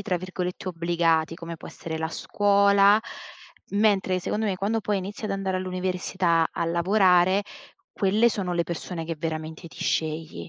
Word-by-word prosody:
tra 190 -2 -1
virgolette 180 +1 -5
"obbligati", 165 -2 +1
come 165 -1 -7
può - - -11
essere 160 -1 -6
la 160 - -1
scuola, 200 +3 +4 0.7
mentre 200 -3 +2
secondo 215 +4 -2
me 195 - 0
quando 210 +4 -1
poi 205 -1 -1
inizi 200 +3 -6
ad 210 - -2
andare 195 -1 -1
all'università, 185 -2 0
a - - -2
lavorare, 185 +2 +3 0.5
quelle 210 +4 +3
sono 190 -5 -2
le 170 - +2
persone 170 0 -5
che 165 0 -4
veramente 160 +1 -5
ti - - -9
scegli. 155 - -2
185 Hz, 155 wpm, -25 LUFS, 165-200 Hz, 0.7 s, scuola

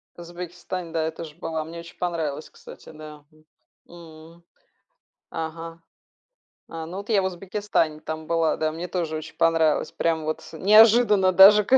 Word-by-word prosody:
В - - -16
Узбекистане, 175 0 -7
да, 160 -1 -1
я 160 - -2
тоже 160 -1 -9
была. 160 -2 -4
Мне 165 +2 -9
очень 170 0 -12
понравилось, 160 -4 -3
кстати, - - -14
да. 150 -1 -12
М, 155 0 -25 0.9
м. 170 0 -22 0.9
Ага. 165 +1 -6 0.9
А, 165 -1 -6
ну 180 +4 -7
вот 200 - -8
я 205 -4 +3
в - - -3
Узбекистане 185 -4 -2
там 160 0 -6
была, 165 -1 +1
да, 155 0 -1
мне 175 +2 -6
тоже 165 -3 -3
очень 155 - -8
понравилось. 165 -2 +2
Прям 160 -2 -1
вот 155 0 -3
с 160 - -11
неожиданно 210 -1 +5
даже, 200 +3 +8
ка 265 - +5
165 Hz, 170 wpm, -24 LUFS, 160-185 Hz, 0.9 s, даже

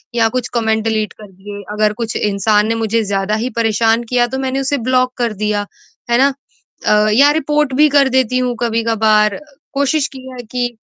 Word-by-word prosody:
या 225 -1 +3
कुछ 250 +1 -3
comment 220 -2 0
delete 215 -3 -1
कर 210 -2 -14
दिए, 205 +2 -10
अगर 210 0 +1
कुछ 225 0 -4
इंसान 210 +1 +1
ने 230 - 0
मुझे 225 0 0
ज़्यादा 200 +1 -1
ही 255 - -2
परेशान 225 +1 +1
किया 245 -1 +2
तो 265 - -4
मैंने 265 0 -2
उसे 275 +1 0
ब्लॉक 255 0 +2
कर 235 -3 -1
दिया, 210 -1 0 0.4
है 235 - +3
ना? 275 +1 +3 0.5
अ, 210 0 +3
या 285 +5 +5
रिपोर्ट 300 -2 0
भी 300 +3 +5
कर 275 -2 +3
देती 255 -1 +1
हूँ 250 -1 -1
कभी-कभार 220 -2 +1 0.3
कोशिश 280 +1 +1
की 260 0 -10
है 245 -1 -8
कि 245 -1 -1
230 Hz, 195 wpm, -16 LUFS, 215-260 Hz, 0.5 s, या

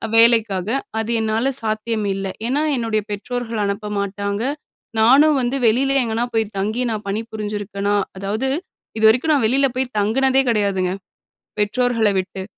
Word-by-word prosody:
வேலைக்காக 225 -4 +4 0.3
அது 220 +1 -2
என்னால 220 +5 0
சாத்தியம் 215 0 -2
இல்ல. 195 0 -4 0.2
ஏன்னா, 280 +4 +1
என்னுடைய 225 -3 0
பெற்றோர்கள் 225 +1 -3
அனுப்ப 200 +1 -3
மாட்டாங்க. 200 +2 -2 0.6
நானும் 275 +6 +5
வந்து 245 +2 -1
வெளியில 270 +5 +2
எங்கேனா 230 +1 -1
போய் 220 -1 0
தங்கி 215 +5 -1
நான் 215 -2 -4
பணிபுரிஞ்சிருக்கேனா? 205 -1 -3 0.2
அதாவது 215 +7 -2 0.5
இதுவரைக்கும் 245 +8 +4
நான் 265 -6 +2
வெளியில 275 +3 +3
போய் 260 -2 -2
தங்குனதே 265 +6 +2
கிடையாதுங்க, 200 -4 +1 0.7
பெற்றோர்கள 230 0 +2
விட்டு. 190 0 -5
220 Hz, 130 wpm, -20 LUFS, 205-245 Hz, 0.7 s, நானும்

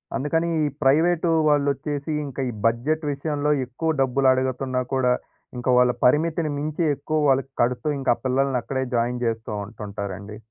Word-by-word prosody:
అందుకని, 160 +5 0 0.2
ఈ - - +2 0.2
ప్రైవేటు 165 +5 +3 0.2
వాళ్ళొచ్చేసి 145 0 0
ఇంకా 135 -1 -5
ఈ - - -3
బడ్జెట్ 140 +8 +1
విషయంలో 145 +1 -1
ఎక్కువ 130 +7 -3
డబ్బులు 135 0 +3
అడుగుతున్నా 130 0 -1
కూడా, 125 -1 +3 0.4
ఇంకా 125 +1 -2
వాళ్ళ 125 0 +5
పరిమితిని 155 +3 +2
మించి 155 +3 -2
ఎక్కువ 155 +3 -2
వాళ్ళకి 135 0 +1
కడుతూ, 120 +3 0
ఇంకా 130 -3 +2
పిల్లల్ని 130 0 +1
అక్కడే 130 +1 -2
జాయిన్ 120 +1 0
జేస్తా 115 -1 -2
ఉంటుంటారండి. 100 -1 -7
135 Hz, 145 wpm, -23 LUFS, 125-150 Hz, 0.4 s, వాళ్ళ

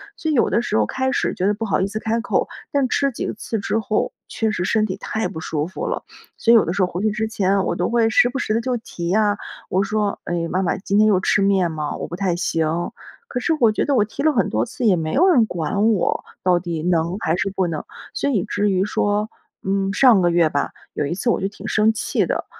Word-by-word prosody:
所 315 - -2
以 - - +1
有 240 - +3
的 230 - +2
时 240 - -1
候 110 - +3
开 260 - -1
始 - - 0
觉 185 - -2
得 205 - +3
不 220 +2 -4
好 200 - +1
意 195 - +1
思 215 +2 -4
开 225 +1 -1
口， 245 - 0 0.2
但 280 -2 +2
吃 275 +2 +1
几 235 - -3
次 220 +1 -4
之 210 +2 -1
后 215 -1 -1 0.2
确 220 -1 -1
实 180 - -2
身 215 +2 +2
体 185 -3 -3
太 220 0 -2
不 175 -3 -7
舒 155 -1 -2
服 185 - -5
了。 - - -3 0.3
所 230 - +3
以 - - +8
有 220 - +6
的 - - -2
时 200 - -1
候 180 - +3
回 180 - -4
去 215 0 +1
之 215 +1 -2
前 195 -2 +1
我 - - -1
都 175 +1 -1
会 230 -1 +3
时 240 +2 +4
不 265 +2 -4
时 215 - -1
地 225 - +1
就 250 +1 -1
提 175 -6 -6
呀， 205 +1 +2 0.3
我 190 +2 +2
说： 205 0 -1
“哎， 170 -1 -2
妈 185 - 0
妈 185 - 0
今 195 +1 -1
天 215 - +6
又 200 -4 +4
吃 195 - +2
面 195 -3 +3
吗？ 150 -2 -3
我 - - -5
不 175 - -6
太 185 -2 0
行。” 165 0 -1 0.4
可 250 - -3
是 330 - 0
我 230 -4 +5
觉 - - 0
得 285 - 0
我 215 -5 +3
提 220 - -6
了 310 - +4
很 245 - +1
多 - - 0
次 245 +1 -4
也 205 -4 +5
没 160 -2 -2
有 345 +8 +4
人 260 -12 +5
管 200 +6 0
我， 200 -5 0 0.2
到 180 -1 +3
底 170 -3 -4
能 170 +1 0
还 160 -3 0
是 195 +2 -1
不 190 -2 0
能。 160 -3 -4 0.3
所 280 - -1
以 215 -10 0
至 205 0 0
于 190 0 +1
说 210 +1 0 0.3
嗯， 195 0 0
上 240 -6 +5
个 175 - +3
月 170 -1 +4
吧， 145 -1 -1 0.2
有 145 - -1
一 145 - -2
次 200 +7 -1
我 - - +1
就 195 - 0
挺 210 0 -10
生 215 +1 +3
气 220 - -1
的， - - -2
200 Hz, 290 characters per minute, -21 LUFS, 180-225 Hz, 0.4 s, 以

